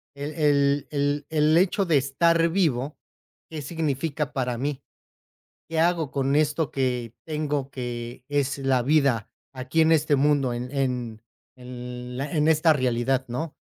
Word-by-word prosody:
El 145 Hz, +2 st, -5 dB
el 145 Hz, -2 st, +2 dB
el 145 Hz, 0 st, 0 dB
el 155 Hz, 0 st, +3 dB
hecho 190 Hz, +2 st, +2 dB
de 165 Hz, -4 st, +3 dB
estar 165 Hz, +5 st, +2 dB
vivo, 155 Hz, -6 st, 0 dB, 0.5 s
¿qué 155 Hz, -2 st, -6 dB
significa 150 Hz, -1 st, -2 dB
para 125 Hz, -3 st, -1 dB
mí? 140 Hz, +2 st, -3 dB, 0.9 s
¿Qué 160 Hz, -1 st, 0 dB
hago 165 Hz, -3 st, +1 dB
con 135 Hz, 0 st, 0 dB
esto 150 Hz, +1 st, +1 dB
que 125 Hz, -3 st, -2 dB
tengo 150 Hz, -3 st, -2 dB
que 120 Hz, -1 st, -6 dB
es 145 Hz, 0 st, 0 dB
la 135 Hz, -2 st, +1 dB
vida 135 Hz, -5 st, +2 dB, 0.3 s
aquí 130 Hz, +5 st, -1 dB
en 160 Hz, 0 st, +5 dB
este 150 Hz, -2 st, +3 dB
mundo, 140 Hz, -2 st, +2 dB
en 120 Hz, +1 st, -4 dB
en 125 Hz, -5 st, -2 dB, 0.3 s
el 125 Hz, 0 st, -8 dB
a 140 Hz, +1 st, -3 dB
en 150 Hz, -2 st, +2 dB
esta 160 Hz, +1 st, +5 dB
realidad, 130 Hz, -1 st, 0 dB
no? 145 Hz, +6 st, -4 dB
140 Hz, 150 wpm, -25 LUFS, 125-155 Hz, 0.9 s, en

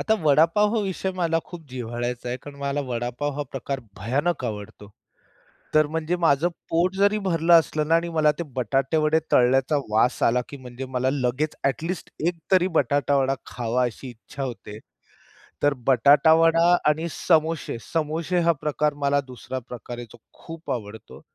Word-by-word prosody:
आता 220 Hz, -, +2 dB
वडापाव 165 Hz, +9 st, +4 dB
हा 225 Hz, -, +2 dB
विषय 190 Hz, 0 st, -2 dB
मला 170 Hz, -3 st, 0 dB
खूप 175 Hz, -2 st, -10 dB
जिव्हाळ्याचा 120 Hz, 0 st, -4 dB
आहे 125 Hz, -, -2 dB
कारण 145 Hz, -1 st, -10 dB
मला 140 Hz, +1 st, -2 dB
वडापाव 125 Hz, +4 st, -2 dB
हा 145 Hz, -, -1 dB
प्रकार 135 Hz, 0 st, -4 dB, 0.2 s
भयानक 130 Hz, -, -1 dB
आवडतो. 105 Hz, -2 st, -7 dB, 0.8 s
तर 155 Hz, -1 st, +4 dB
म्हणजे 160 Hz, +2 st, -2 dB
माझं 165 Hz, -2 st, +2 dB, 0.2 s
पोट 175 Hz, +3 st, +1 dB
जरी 200 Hz, +2 st, +3 dB
भरलं 170 Hz, -3 st, +2 dB
असलं 155 Hz, -2 st, +3 dB
ना 165 Hz, -, +4 dB
आणि 170 Hz, +1 st, 0 dB
मला 155 Hz, -2 st, +3 dB
ते -, -, -1 dB
बटाटे 135 Hz, +5 st, 0 dB
वडे 155 Hz, +1 st, +3 dB
तळण्याचा 130 Hz, +4 st, +3 dB
वास 110 Hz, +4 st, +2 dB
आला 125 Hz, +2 st, +3 dB
की 140 Hz, -, -8 dB
म्हणजे 130 Hz, 0 st, -8 dB
मला 130 Hz, 0 st, 0 dB
लगेच 135 Hz, +3 st, -1 dB
ऍटलिस्ट 165 Hz, +6 st, -3 dB, 0.2 s
एक 175 Hz, -1 st, -1 dB
तरी 185 Hz, -1 st, +4 dB
बटाटावडा 140 Hz, 0 st, +2 dB
खावा 120 Hz, +1 st, -1 dB
अशी 125 Hz, +2 st, -4 dB
इच्छा 120 Hz, +3 st, -8 dB
होते. 115 Hz, -5 st, -7 dB, 0.9 s
तर 145 Hz, 0 st, +4 dB
बटाटावडा 160 Hz, +6 st, +5 dB
आणि 160 Hz, +3 st, 0 dB
समोसे. 160 Hz, -6 st, 0 dB
समोसे 165 Hz, -, -1 dB
हा -, -, +7 dB
प्रकार 150 Hz, 0 st, 0 dB
मला 140 Hz, 0 st, +2 dB
दुसरा 130 Hz, +1 st, -6 dB
प्रकार 120 Hz, 0 st, -8 dB
आहे 120 Hz, -, -7 dB
जो -, -, -14 dB, 0.3 s
खूप 165 Hz, -3 st, -7 dB
आवडतो. 110 Hz, -3 st, -7 dB
145 Hz, 160 wpm, -24 LUFS, 125-165 Hz, 0.9 s, हा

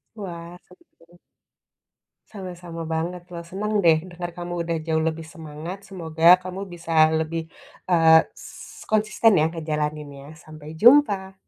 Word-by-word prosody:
Wah, 175 Hz, -4 st, -8 dB
senang. 175 Hz, -1 st, -23 dB, 1.1 s
Sama-sama 180 Hz, -4 st, -8 dB
banget, 165 Hz, +2 st, -3 dB
loh. 170 Hz, -1 st, -6 dB
Senang 195 Hz, +5 st, -5 dB
deh, 160 Hz, -2 st, +6 dB
dengar 175 Hz, 0 st, -6 dB
kamu 175 Hz, -1 st, -4 dB
udah 165 Hz, 0 st, -2 dB
jauh 160 Hz, -1 st, +1 dB
lebih 160 Hz, 0 st, -3 dB
semangat. 160 Hz, +3 st, -9 dB
Semoga, 170 Hz, -1 st, +4 dB
kamu 185 Hz, +1 st, -6 dB
bisa 165 Hz, -2 st, +2 dB
lebih, 160 Hz, 0 st, -4 dB, 0.4 s
eee, 160 Hz, -2 st, +6 dB
s -, -, -13 dB
konsisten 215 Hz, -1 st, +3 dB
ya, 160 Hz, +1 st, +2 dB
ngejalaninnya. 150 Hz, -3 st, -5 dB
Sampai 155 Hz, -1 st, -12 dB
jumpa. 210 Hz, -, +4 dB
170 Hz, 125 wpm, -23 LUFS, 160-180 Hz, 1.1 s, deh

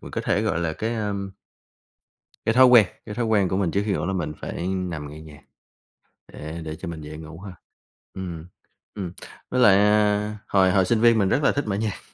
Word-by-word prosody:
mình -, -, -10 dB
có -, -, -3 dB
thể -, -, 0 dB
gọi 85 Hz, -, 0 dB
là 85 Hz, -2 st, -1 dB
cái 115 Hz, +7 st, -3 dB
à 105 Hz, -2 st, -2 dB, 1.3 s
cái 115 Hz, -, +2 dB
thói 130 Hz, -, +8 dB
quen 120 Hz, -5 st, +7 dB, 0.2 s
cái 105 Hz, -, -7 dB
thói 120 Hz, -, -1 dB
quen 105 Hz, -4 st, +2 dB
của 95 Hz, -, -1 dB
mình 95 Hz, -4 st, 0 dB
trước 100 Hz, -, +1 dB
khi 105 Hz, -, 0 dB
ngủ -, -, -2 dB
là 95 Hz, -, -2 dB
mình 75 Hz, -5 st, -3 dB
phải 85 Hz, -, -4 dB
nằm 90 Hz, -6 st, -3 dB
nghe 75 Hz, +2 st, -10 dB
nhạc 75 Hz, -2 st, -13 dB, 0.9 s
để 80 Hz, +3 st, -8 dB
để 80 Hz, -1 st, -6 dB
cho 85 Hz, -, -8 dB
mình 80 Hz, -2 st, -6 dB
dễ 75 Hz, +1 st, -8 dB
ngủ 80 Hz, +1 st, -10 dB
hơn, 95 Hz, -1 st, -9 dB, 0.6 s
ừm, 85 Hz, -3 st, -7 dB, 0.5 s
ừm, 95 Hz, -4 st, -5 dB, 0.4 s
với 125 Hz, -, -1 dB
lại, 105 Hz, -5 st, +7 dB
à, 105 Hz, 0 st, +2 dB
hồi 95 Hz, -2 st, +3 dB
hồi 95 Hz, -1 st, +3 dB
sinh 115 Hz, +2 st, +1 dB
viên 115 Hz, -1 st, +5 dB
mình 100 Hz, -3 st, +2 dB
rất 145 Hz, -, +1 dB
là -, -, +4 dB
thích 145 Hz, -, -2 dB
mở 100 Hz, -, -1 dB
nhạc 105 Hz, 0 st, -3 dB
95 Hz, 225 wpm, -24 LUFS, 85-105 Hz, 1.3 s, thói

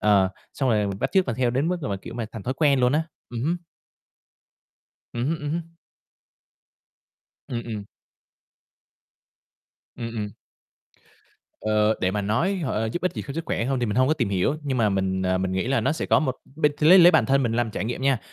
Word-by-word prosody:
ờ, 100 Hz, -3 st, +4 dB, 0.3 s
xong 135 Hz, -, 0 dB
rồi 105 Hz, -2 st, +2 dB
mình 100 Hz, 0 st, -4 dB
bắt -, -, -1 dB
chước 190 Hz, -2 st, +3 dB
và 115 Hz, -, -1 dB
theo 125 Hz, +1 st, +1 dB
đến 135 Hz, +6 st, 0 dB
mức 180 Hz, -, 0 dB
mà, 100 Hz, -6 st, -2 dB
kiểu 105 Hz, +4 st, -10 dB
mà, 120 Hz, -2 st, -3 dB
thành 110 Hz, -, -7 dB
thói 130 Hz, +5 st, -2 dB
quen 140 Hz, -2 st, +3 dB
luôn 125 Hz, 0 st, +3 dB
á, 155 Hz, +2 st, +2 dB, 0.3 s
ừm 120 Hz, -1 st, -5 dB
hứm. 165 Hz, +6 st, +1 dB, 1.6 s
Ừm 120 Hz, +1 st, -2 dB
hứm, 160 Hz, +2 st, -1 dB
ừm 150 Hz, -1 st, -4 dB
hứm. 165 Hz, +1 st, -4 dB, 1.7 s
Ừm, 120 Hz, -1 st, -3 dB
ừm. 110 Hz, -3 st, -5 dB, 2.1 s
Ừm, 115 Hz, -1 st, -5 dB
ừm. 105 Hz, -1 st, -3 dB, 1.3 s
Ờ, 110 Hz, 0 st, +2 dB
để 90 Hz, -, +1 dB
mà 105 Hz, +1 st, -2 dB
nói 165 Hz, -, +1 dB
h 170 Hz, -5 st, -3 dB
ơ, 110 Hz, -2 st, -1 dB
giúp 175 Hz, -, -3 dB
ích 185 Hz, -, +1 dB
gì -, -, -4 dB
cho 140 Hz, -, -5 dB
sức 165 Hz, +3 st, -4 dB
khỏe -, -, -1 dB
hông, 135 Hz, +1 st, 0 dB
thì 120 Hz, -, +1 dB
mình 105 Hz, -, -2 dB
hông 130 Hz, +1 st, +4 dB
có 155 Hz, -, +3 dB
tìm 125 Hz, -9 st, -1 dB
hiểu, 100 Hz, +9 st, +1 dB
nhưng 135 Hz, -3 st, -1 dB
mà 110 Hz, -2 st, +3 dB
mình, 95 Hz, -1 st, 0 dB
ờ, 95 Hz, 0 st, +1 dB
mình 95 Hz, 0 st, -1 dB
nghĩ 95 Hz, +3 st, -1 dB
là 135 Hz, -, +2 dB
nó -, -, +1 dB
sẽ 160 Hz, -, -3 dB
có -, -, +4 dB
một 130 Hz, -4 st, -1 dB, 0.2 s
b 160 Hz, -, -5 dB, 0.2 s
lấy 165 Hz, +5 st, +8 dB
lấy 175 Hz, 0 st, +9 dB
bản 160 Hz, -, +3 dB
thân 135 Hz, 0 st, +3 dB
mình 115 Hz, -3 st, 0 dB
làm 120 Hz, -1 st, 0 dB
trải 105 Hz, -, -3 dB
nghiệm 120 Hz, +3 st, -4 dB
nha, 135 Hz, -2 st, +3 dB
120 Hz, 225 wpm, -24 LUFS, 105-145 Hz, 2.1 s, lấy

